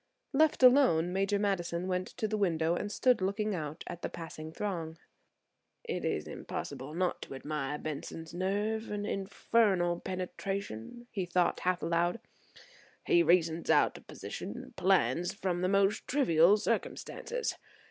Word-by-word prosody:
Left 305 -1 +3
alone, 245 - +6
Major 195 +2 +1
Madison 185 -3 -1
went 185 0 -1
to 220 - 0
the 215 - -1
window 170 -5 +1
and 205 +4 -2
stood 250 -1 +3
looking 205 +3 0
out 155 -4 -4
at 175 - -7
the - - -3
passing 160 -2 -8
throng. 165 -4 -4 0.9
"It - - -3
is - - -1
impossible 140 +4 -6
not 180 0 0
to - - -7
admire 150 0 -3
Benson's 155 +2 -6
nerve 205 +5 -1
and 205 0 -3
his - - -1
infernal 195 -3 +1
penetration," 190 - -5
he 190 -4 -2
thought 175 0 +2
half 180 -1 0
aloud. 170 +5 +1 0.9
"He 350 -3 +5
reasons 170 - +2
out - - +4
a - - -10
position - - -7
and - - -10
plans 165 - +2
from 180 -3 -1
the 185 - +1
most 195 +1 +2
trivial 200 - +5
circumstances. 470 - -2
185 Hz, 145 wpm, -31 LUFS, 165-205 Hz, 0.9 s, alone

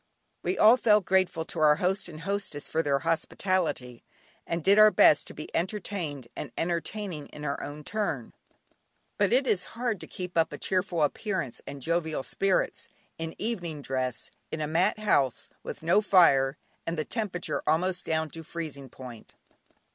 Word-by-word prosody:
We 375 - -1
all 225 +4 +7
felt 210 -5 +4
grateful 185 -4 +2
to 165 - -7
our 150 -1 +6
host 185 +3 0
and 155 -1 -9
hostess 195 -5 -3
for 160 - +1
their 145 -3 +1
hospitality, 165 -4 -1 0.4
and 165 -1 -2
did 200 +4 +5
our 215 0 +9
best 205 -8 +5
to - - -10
be 150 - -8
entertained 175 - -3
and - - -6
entertaining 170 -1 -3
in 150 - -9
our 145 +1 -4
turn, 165 - -3 0.9
but 205 -1 +3
it 260 +3 +4
is 185 -7 +2
hard 235 -5 -1
to - - -8
keep 180 -2 -3
up 165 - +2
a - - -6
cheerful 185 -3 0
appearance 165 - -2
and 140 -2 -7
jovial 160 -3 0
spirits, 195 +5 0 0.3
in 165 0 -4
evening 175 -10 -3
dress, 130 -2 -3 0.2
in 160 - -4
a 155 - 0
mat 175 +8 +2
house, 145 - +1
with - - -7
no 175 +6 +4
fire 140 -9 +5 0.3
and 165 0 -2
the 155 - -1
temperature 205 -7 -2
almost 180 +3 +1
down 160 -1 -1
to 165 - -8
freezing 155 -5 -6
point. 120 -3 -11
165 Hz, 165 wpm, -28 LUFS, 150-195 Hz, 0.9 s, our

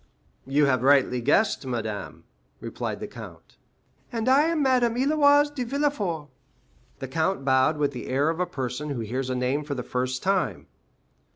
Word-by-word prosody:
"You 145 +2 +3
have 130 -3 +2
rightly 130 -2 +3
guessed, 150 - +2
madame," 110 -5 -5 0.4
replied - - -5
the - - -4
count. - - -12 0.5
"And 230 -1 -3
I 275 +4 +5
am 325 -2 +1
Madame 250 -3 +2
Héloïse 290 +2 +4
de 260 -4 -3
Villefort." 230 - -2 0.7
The 135 - -6
count 160 +2 -1
bowed 130 +3 +3
with 145 -1 0
the 125 - -7
air 140 +5 +1
of 165 - -6
a 180 - 0
person 135 -1 -4
who 135 -5 -3
hears 125 +4 -3
a 130 - -1
name 130 +4 -1
for 145 -1 -4
the 125 - -4
first 125 +1 -3
time. 180 - 0
145 Hz, 170 wpm, -25 LUFS, -, 0.7 s, I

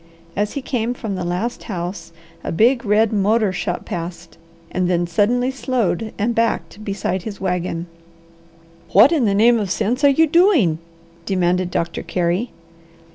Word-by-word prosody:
As 205 +1 -1
he 280 - -4
came 245 -2 -2
from 220 -4 -4
the 185 -1 -3
last 185 +8 -3
house 175 -4 -5 0.3
a - - -3
big, 235 +8 +3
red 215 +1 +3
motor 210 0 +2
shot 180 -1 -3
past 170 -1 -7 0.3
and 180 -1 0
then 175 -1 +1
suddenly 235 +9 +1
slowed 235 -6 -1
and 225 +4 0
backed 230 -2 -1
beside 195 -2 -2
his 200 0 -7
wagon. 180 -2 -2 1.1
"What 215 - +7
in 300 -8 +2
the 200 -2 +2
name 230 +3 +5
of 205 -3 -2
sense 225 +8 -1
are 285 - +7
you 320 +4 +4
doing?" 310 - +3 0.5
demanded 180 -1 +1
Doctor 170 -1 -2
Carey. 180 +6 -1
205 Hz, 155 wpm, -20 LUFS, 180-235 Hz, 1.1 s, What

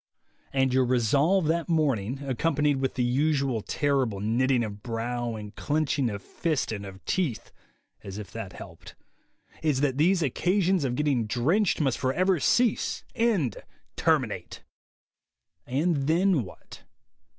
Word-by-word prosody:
And 130 -1 +1
your 130 0 +4
resolve 140 - +2
that 165 +2 0
morning, 135 -6 0
accompanied 145 +2 +1
with 135 0 -2
the 125 - +1
usual 135 -1 +1
terrible 135 -6 0
knitting 120 +4 +1
of 105 -2 -6
brow 120 0 -3
and 105 -1 -8
clenching 145 -4 0
of 100 -2 -6
fist 160 -8 -2
and 100 -2 -5
of 95 0 -12
teeth 160 -12 -1 0.5
(as 100 0 -7
if 105 -2 -8
that 110 -5 -7
helped) - - -11 0.7
is 150 -4 +1
that 140 -2 0
these 175 +2 +3
occasions 180 - +1
of 125 -2 -1
getting 135 -6 +1
drenched 160 - +1
must 135 -5 +1
forever 180 +7 +1
cease, 240 - +1
end, 205 - +1 0.4
terminate. - - 0 1.0
And 155 +7 +1
then 175 -1 +3
what? 95 - -13
135 Hz, 135 wpm, -27 LUFS, 120-160 Hz, 1.0 s, your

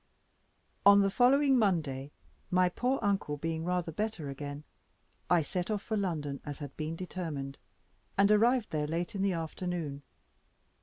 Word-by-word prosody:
On 200 0 +8
the 195 0 +2
following 265 +3 +4
Monday, 150 - 0 0.4
my 180 0 +3
poor 250 +8 0
uncle 195 -7 0
being 160 +2 -3
rather 180 -1 -1
better 180 -5 -3
again, 145 +1 -6 0.7
I 175 -3 +4
set 180 +6 -3
off 210 -2 -1
for 220 - -2
London, 155 -9 -2
as 145 -1 -6
had 145 -3 -8
been 155 +1 -3
determined, 160 -6 -5 0.6
and 200 +1 +5
arrived 230 +2 +3
there 150 -1 -1
late 165 +2 -2
in 195 - -3
the 195 -1 +2
afternoon. 165 -3 -4
175 Hz, 150 wpm, -31 LUFS, 150-200 Hz, 0.7 s, On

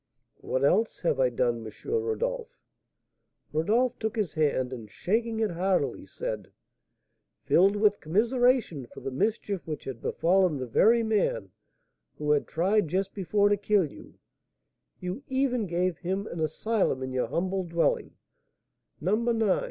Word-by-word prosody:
"What 130 - -2
else 210 +10 +2
have 160 -6 +1
I 130 -1 +4
done, 120 -1 0
M. 110 - -7 0.2
Rodolph?" 475 +2 -2 1.0
Rodolph 230 +11 +1
took 220 +1 -2
his 210 -8 -1
hand, 140 -5 +1
and, 115 -4 -8
shaking 225 - -1
it 220 -3 +1
heartily, 185 +2 0
said: - - -5 0.9
"Filled 195 +4 +4
with 205 0 +3
commiseration 225 - +1
for - - -12
the 135 - -4
mischief 200 - -1
which 155 -2 -4
had 130 -4 -7
befallen 180 -2 +2
the 130 - -3
very 225 - +4
man 225 - 0 0.7
who 150 0 0
had 145 -1 +2
tried 190 +3 +1
just 190 +4 -1
before 205 +1 +2
to 205 - +3
kill 205 -2 +2
you, - - -14 0.8
you 180 +8 -4
even 260 -5 0
gave 175 0 -1
him 190 +3 -2
an 170 - -6
asylum 160 - 0
in 130 0 -4
your 125 -2 0
humble 185 +8 -1
dwelling, 170 -1 0 0.8
No. 195 +7 +1
190 Hz, 145 wpm, -28 LUFS, 155-225 Hz, 1.0 s, I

